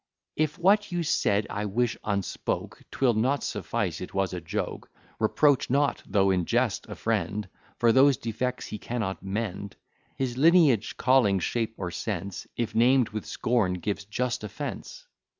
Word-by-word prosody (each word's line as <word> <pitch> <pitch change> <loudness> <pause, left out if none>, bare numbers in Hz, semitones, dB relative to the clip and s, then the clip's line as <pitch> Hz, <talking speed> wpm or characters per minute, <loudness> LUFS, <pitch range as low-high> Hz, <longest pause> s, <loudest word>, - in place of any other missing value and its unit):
If 155 +1 0
what 200 +3 +3
you 175 -1 -1
said 105 -8 +1
I 105 +1 -2
wish 115 +3 0
unspoke, 100 -2 -3
'Twill 130 -3 +2
not 130 +6 +1
suffice - - -2
it - - -7
was 95 -1 0
a 90 - -4
joke: 80 - -4 0.3
Reproach 135 +5 +3
not, 140 +1 +1
though 95 -1 +3
in 90 -2 +1
jest, - - 0
a - - -6
friend 105 -1 -1 0.3
For 115 -1 +4
those 135 +2 +5
defects 125 +3 -3
he 105 - -6
cannot 110 -5 -3
mend; 100 0 -4 0.4
His 125 -2 -2
lineage, 155 - +4
calling, 125 -6 +4
shape, 115 +4 -2
or 90 -2 -4
sense, 100 0 -4
If 120 -2 -2
named 125 +1 +4
with 110 0 -6
scorn, 115 -6 +1
gives 100 +3 -3
just 120 +3 -2
offence. 105 - -6
115 Hz, 155 wpm, -27 LUFS, 100-130 Hz, 0.4 s, those